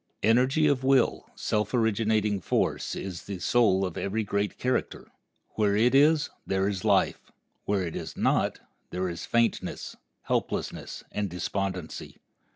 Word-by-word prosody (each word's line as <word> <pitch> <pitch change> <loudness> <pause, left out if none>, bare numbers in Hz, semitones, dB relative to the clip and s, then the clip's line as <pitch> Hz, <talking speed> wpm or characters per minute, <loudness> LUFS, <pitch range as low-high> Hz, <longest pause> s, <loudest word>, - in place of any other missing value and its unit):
Energy 130 +8 +4
of 140 -3 +2
will, 135 -2 +2
self 105 +1 -1
originating 110 -2 +1
force, - - 0
is 90 -3 -6
the 100 - -5
soul 95 0 +3
of 90 - -4
every 110 +3 -1
great 100 0 -1
character. 125 0 -2 0.4
Where 105 -2 +1
it 120 +4 +3
is, 150 +3 +4
there 95 0 0
is 95 -3 -2
life; - - +1 0.3
where 100 -2 +1
it 85 -2 -4
is - - -6
not, - - +1 0.3
there 90 +1 -2
is 85 -2 -5
faintness, 115 0 0 0.3
helplessness, - - -3
and 105 -1 -2
despondency. 90 0 -4
105 Hz, 140 wpm, -27 LUFS, 95-120 Hz, 0.4 s, Energy